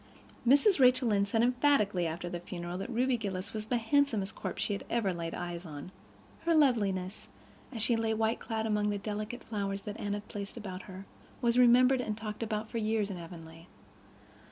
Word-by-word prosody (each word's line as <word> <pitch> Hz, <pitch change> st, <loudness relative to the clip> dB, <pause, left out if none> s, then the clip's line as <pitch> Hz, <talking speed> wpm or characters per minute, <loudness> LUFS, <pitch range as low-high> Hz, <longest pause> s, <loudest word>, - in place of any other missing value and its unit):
Mrs. 290 Hz, -, +5 dB
Rachel 255 Hz, -1 st, +5 dB
Lynde 200 Hz, -1 st, +2 dB
said 225 Hz, +3 st, +2 dB
emphatically 245 Hz, -, +3 dB
after 170 Hz, +2 st, -4 dB
the 175 Hz, 0 st, -4 dB
funeral 175 Hz, 0 st, -6 dB
that 195 Hz, -, -5 dB
Ruby 250 Hz, +1 st, +1 dB
Gillis 195 Hz, -4 st, -4 dB
was 215 Hz, -1 st, -4 dB
the 245 Hz, -, +1 dB
handsomest 230 Hz, -4 st, +1 dB
corpse -, -, -4 dB
she 200 Hz, -1 st, -1 dB
ever 215 Hz, -6 st, +1 dB
laid 165 Hz, -1 st, -4 dB
eyes 175 Hz, -1 st, -5 dB
on. 155 Hz, 0 st, -8 dB, 0.5 s
Her 335 Hz, -1 st, +3 dB
loveliness, 205 Hz, -10 st, +1 dB, 0.4 s
as 225 Hz, -5 st, -2 dB
she 235 Hz, -, +3 dB
lay, 225 Hz, -1 st, 0 dB
white 220 Hz, +1 st, +1 dB
clad, 220 Hz, -1 st, -3 dB
among 210 Hz, -1 st, +1 dB
the 205 Hz, -, -1 dB
delicate 210 Hz, +4 st, -5 dB
flowers 200 Hz, -2 st, -3 dB
that 210 Hz, 0 st, -6 dB
Anne 205 Hz, 0 st, -2 dB
had 205 Hz, 0 st, -5 dB
placed 200 Hz, +1 st, -6 dB
about 190 Hz, -4 st, -6 dB
her, 190 Hz, +1 st, -8 dB, 0.3 s
was 240 Hz, -1 st, +2 dB
remembered 250 Hz, +1 st, +6 dB
and 215 Hz, -3 st, -3 dB
talked 215 Hz, -1 st, -6 dB
of 215 Hz, -1 st, -2 dB
for 230 Hz, -, -1 dB
years 215 Hz, -2 st, 0 dB
in 180 Hz, -, -5 dB
Avonlea. 165 Hz, 0 st, -11 dB
210 Hz, 190 wpm, -31 LUFS, 190-235 Hz, 0.5 s, remembered